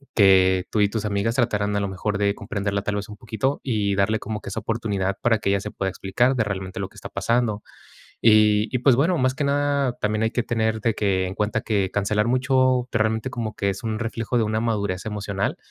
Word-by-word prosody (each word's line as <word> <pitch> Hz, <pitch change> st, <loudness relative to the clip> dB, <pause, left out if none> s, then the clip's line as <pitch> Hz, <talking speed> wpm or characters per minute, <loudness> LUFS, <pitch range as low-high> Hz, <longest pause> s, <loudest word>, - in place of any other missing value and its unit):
que 95 Hz, -2 st, +5 dB
tú 110 Hz, -, 0 dB
y 100 Hz, -, +5 dB
tus 110 Hz, 0 st, -3 dB
amigas 105 Hz, +2 st, 0 dB
trataran, 105 Hz, -5 st, 0 dB
a -, -, +1 dB
lo 100 Hz, -, -1 dB
mejor, 100 Hz, +2 st, -2 dB
de 100 Hz, 0 st, +1 dB
comprenderla 100 Hz, -3 st, -3 dB
tal 105 Hz, 0 st, -2 dB
vez 100 Hz, 0 st, -5 dB
un 105 Hz, -, -9 dB
poquito, 115 Hz, +5 st, -2 dB
y 105 Hz, -6 st, 0 dB
darle 100 Hz, +3 st, +1 dB
como 110 Hz, 0 st, -5 dB
que -, -, -7 dB
esa 100 Hz, -, -4 dB
oportunidad 100 Hz, -4 st, -2 dB
para 115 Hz, -2 st, +2 dB
que 100 Hz, -, -1 dB
ella 100 Hz, 0 st, +2 dB
se 105 Hz, -, -6 dB
pueda 95 Hz, -, -2 dB
explicar 100 Hz, +8 st, 0 dB
de 115 Hz, -, +3 dB
realmente 95 Hz, -2 st, -4 dB
lo -, -, -2 dB
que -, -, -24 dB
está -, -, -9 dB
pasando. 115 Hz, -3 st, 0 dB, 0.6 s
Y 105 Hz, -1 st, +5 dB
y -, -, +3 dB
pues 130 Hz, -1 st, +5 dB
bueno, 165 Hz, +6 st, +2 dB
más 130 Hz, 0 st, +1 dB
que 145 Hz, -, -2 dB
nada 140 Hz, -2 st, +1 dB
también 105 Hz, +1 st, 0 dB
hay 110 Hz, -, +1 dB
que 120 Hz, -, 0 dB
tener 110 Hz, -2 st, 0 dB
de 115 Hz, -1 st, +1 dB
que 95 Hz, -3 st, 0 dB
en 95 Hz, -, -5 dB
cuenta 105 Hz, +1 st, -1 dB
que 100 Hz, -4 st, 0 dB
cancelar 105 Hz, +2 st, +1 dB
mucho, 130 Hz, 0 st, +2 dB
realmente 110 Hz, +2 st, 0 dB
como 115 Hz, -4 st, -4 dB
que 100 Hz, -, -1 dB
es 95 Hz, -, -6 dB
un 110 Hz, -2 st, -2 dB
reflejo 115 Hz, +1 st, -3 dB
de 115 Hz, -, +2 dB
una 110 Hz, +1 st, -1 dB
madurez 100 Hz, -5 st, -1 dB
emocional. 100 Hz, -2 st, -2 dB
110 Hz, 235 wpm, -23 LUFS, 100-115 Hz, 0.6 s, que